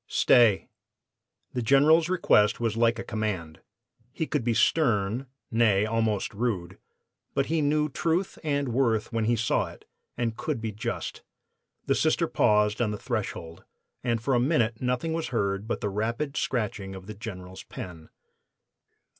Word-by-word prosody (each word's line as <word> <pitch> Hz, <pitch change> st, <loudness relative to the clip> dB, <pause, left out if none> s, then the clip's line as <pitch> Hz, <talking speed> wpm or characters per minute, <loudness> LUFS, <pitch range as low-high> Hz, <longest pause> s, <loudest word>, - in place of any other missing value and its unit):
"'Stay!' 115 Hz, -5 st, +4 dB, 0.9 s
"The 125 Hz, -, -1 dB
General's 150 Hz, +7 st, +5 dB
request 105 Hz, -, +3 dB
was 115 Hz, -2 st, -1 dB
like 115 Hz, 0 st, +3 dB
a 115 Hz, -, -4 dB
command. 100 Hz, -8 st, -3 dB, 0.5 s
He 160 Hz, -, -2 dB
could 125 Hz, -, -1 dB
be 115 Hz, -1 st, +1 dB
stern; 120 Hz, -3 st, +2 dB, 0.2 s
nay, 110 Hz, -3 st, +3 dB
almost 110 Hz, -2 st, 0 dB
rude, 100 Hz, -5 st, -2 dB, 0.6 s
but 140 Hz, -, +2 dB
he 160 Hz, -, +2 dB
knew 150 Hz, +1 st, +2 dB
truth 165 Hz, +6 st, -1 dB
and 145 Hz, -3 st, 0 dB
worth 115 Hz, -2 st, +1 dB
when 115 Hz, -1 st, 0 dB
he 120 Hz, +2 st, +3 dB
saw 115 Hz, +1 st, +1 dB
it, -, -, -13 dB, 0.3 s
and 115 Hz, -2 st, -1 dB
could 115 Hz, -, -3 dB
be 110 Hz, -1 st, -3 dB
just. 105 Hz, +1 st, -4 dB, 0.6 s
The -, -, +2 dB
Sister -, -, +2 dB
paused 105 Hz, +1 st, +2 dB
on 115 Hz, -, +2 dB
the 105 Hz, -, -3 dB
threshold, 85 Hz, -4 st, -4 dB, 0.4 s
and 115 Hz, -2 st, 0 dB
for 130 Hz, +5 st, -1 dB
a 120 Hz, -, +4 dB
minute 120 Hz, -5 st, +1 dB
nothing 125 Hz, +6 st, -1 dB
was 165 Hz, 0 st, -2 dB
heard 100 Hz, -3 st, -1 dB
but -, -, -2 dB
the 105 Hz, -, -1 dB
rapid 115 Hz, +8 st, -2 dB
scratching 100 Hz, -8 st, -2 dB
of 95 Hz, -1 st, -10 dB
the 110 Hz, -, -7 dB
General's 95 Hz, -4 st, -8 dB
pen. 80 Hz, -3 st, -9 dB
115 Hz, 155 wpm, -27 LUFS, 105-130 Hz, 0.9 s, General's